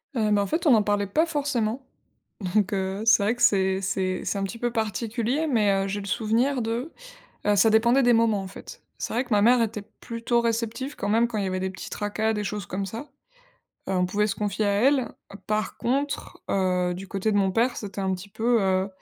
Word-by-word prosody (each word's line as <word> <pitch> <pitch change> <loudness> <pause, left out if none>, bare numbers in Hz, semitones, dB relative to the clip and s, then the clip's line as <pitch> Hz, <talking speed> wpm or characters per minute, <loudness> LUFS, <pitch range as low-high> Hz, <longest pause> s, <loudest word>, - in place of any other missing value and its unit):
Heu, 220 -3 +1
bah, 205 - +3
en - - 0
fait 320 - -1
on - - +6
n'en 220 -3 +5
parlait 205 -1 0
pas 310 - +2
forcément. 275 -7 -1 0.7
Donc, 210 0 +2
heu, 190 +1 -2
c'est 225 -2 +5
vrai 220 +4 +1
que 245 - -11
c'est 190 -3 +3
c'est 185 -1 -1
c'est - - -1
un 195 - -1
petit 195 +4 -4
peu 240 +1 -1
particulier, 230 +6 -1
mais, 220 -8 +3
heu, - - -3
j'ai 205 - -2
le - - -8
souvenir 235 +6 +1
de, 235 +7 -3 0.6
heu, 210 - +4
ça 220 +3 +5
dépendait 235 +5 +4
des 245 -1 +5
moments 225 -3 +2
en - - -7
fait. 195 - -11 0.2
C'est - - -4
vrai 240 - +1
que 250 - -20
ma 205 -2 +3
mère 240 +3 +5
était 220 -2 -2 0.2
plutôt 235 +1 -1
réceptive 230 +4 -2
quand 205 - -3
même 225 +3 +3
quand 225 -3 -3
il 200 - -1
y - - -1
avait 185 0 -2
des 190 0 -2
petits 190 - -8
tracas, 215 +1 -1
des 210 -1 -2
choses 205 0 -4
comme 195 +1 -3
ça. 230 +9 -7 0.8
Heu, - - -1
on 180 -1 +2
pouvait 205 +3 +1
se 200 - -2
confier 205 +1 -2
à - - +2
elle. 255 +4 +2 0.4
Par 215 0 -1
contre, 280 +4 -2
heu, 180 -2 +1
du 190 +2 -8
côté 200 +3 -1
de - - +1
mon 195 -1 +2
père, 240 +4 +2
c'était 200 -1 -6
un 190 0 0
petit 185 +2 -9
peu, 225 +3 +1
heu, 190 0 +1
215 Hz, 235 wpm, -25 LUFS, 195-235 Hz, 0.8 s, on